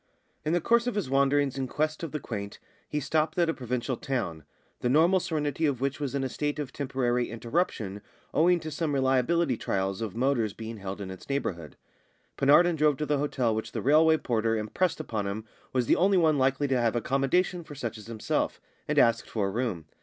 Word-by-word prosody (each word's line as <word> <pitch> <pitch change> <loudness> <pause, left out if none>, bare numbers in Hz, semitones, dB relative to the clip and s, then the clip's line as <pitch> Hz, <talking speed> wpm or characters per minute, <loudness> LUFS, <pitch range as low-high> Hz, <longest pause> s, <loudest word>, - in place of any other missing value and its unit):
In 155 - 0
the 175 - +3
course 235 +6 +3
of 245 - -1
his 195 -11 -2
wanderings 140 0 +2
in 130 - -1
quest 155 +4 -1
of 165 -4 -4
the 150 - -3
quaint 100 -6 -6 0.3
he 150 - -1
stopped 155 +3 0
at 170 -2 +3
a - - -4
provincial 125 0 -2
town, 100 - -3 0.3
the 120 - 0
normal 165 +7 +5
serenity 155 -2 -1
of 135 -4 -1
which 135 +2 -1
was 140 -2 -3
in 135 - 0
a - - 0
state 145 +3 -2
of 145 -3 -5
temporary 125 -3 -1
interruption 115 - -2 0.3
owing 175 +3 +4
to 155 0 -6
some 150 -1 -1
reliability 130 +2 +2
trials 95 +1 -2
of 110 -3 -4
motors 120 -4 +1
being 110 +1 -7
held 100 0 -6
in 95 -1 -5
its 95 - -11
neighbourhood. 85 - -3 0.6
Penarden 165 +5 +5
drove 150 -2 +3
to 155 - -2
the 145 -1 +1
hotel 130 -5 0
which 110 0 -4
the - - -2
railway 160 +3 +5
porter 115 -4 0
impressed 135 - -1
upon 110 -9 -3
him 105 +2 -4 0.3
was 125 -2 +1
the - - +4
only 190 +2 +4
one 160 -4 +3
likely 135 +2 +2
to 130 -2 +1
have 115 0 +1
accommodation 135 +9 +1
for 150 - -10
such 115 -5 -4
as 110 -1 -11
himself, 115 -2 -2 0.3
and - - -1
asked 115 0 +3
for 100 -3 -1
a - - -4
room. 110 -8 -2
135 Hz, 210 wpm, -28 LUFS, 115-155 Hz, 0.6 s, normal